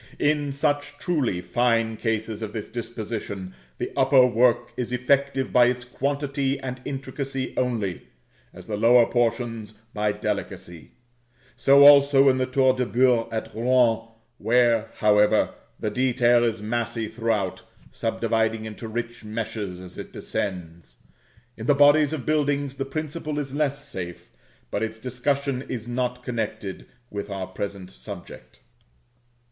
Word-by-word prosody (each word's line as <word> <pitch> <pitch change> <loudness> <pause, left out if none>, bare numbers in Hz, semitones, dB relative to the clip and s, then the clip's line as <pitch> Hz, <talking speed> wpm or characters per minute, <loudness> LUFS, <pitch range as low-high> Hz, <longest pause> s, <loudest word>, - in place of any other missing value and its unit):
In 145 -1 +1
such 145 +1 -1
truly 140 - -1
fine 115 0 +1
cases 110 -1 -2
of 105 -1 -5
this 110 - -5
disposition 110 -5 -5 0.2
the - - -4
upper 130 -1 +5
work 120 0 +2
is 125 -1 -3
effective 135 +1 +1
by 125 - +7
its 125 0 -1
quantity 140 +1 -2
and 125 -1 -6
intricacy 135 -1 -4
only, 115 -8 -2 0.4
as - - -12
the 105 - -3
lower 120 +2 +6
portions 115 -3 -1 0.2
by 105 0 +1
delicacy; 100 -5 -5 0.6
so 140 +1 +6
also 140 -1 +7
in 130 - +2
the 130 0 0
Tour 130 0 +3
de 130 0 -1
Beurre 120 -1 +2
at 110 -1 -4
Rouen, 115 -1 +2 0.3
where, 115 -1 +3
however, 105 0 +3 0.3
the - - -2
detail 120 -2 +3
is 110 -3 -1
massy 115 0 -2
throughout, 110 -5 -1 0.3
subdividing 115 -1 -1
into 110 +1 -7
rich 120 +1 -5
meshes 105 -4 -5
as 90 -1 -10
it - - -9
ascends. 85 -4 -5 0.6
In 115 +1 -6
the 145 - +5
bodies 145 +1 +5
of 155 -5 -4
buildings 145 -2 0
the 135 0 -4
principle 155 +1 -4
is 140 -2 -3
less 140 -1 -1
safe, 90 -10 -7 0.4
but - - -1
its 110 0 -3
discussion 130 +2 -1
is 120 -2 -4
not 125 0 -2
connected 110 -5 -4 0.2
with 100 0 -5
our 95 -2 -4
present 95 0 -6
subject. 100 -2 -11
120 Hz, 140 wpm, -25 LUFS, 110-135 Hz, 0.6 s, by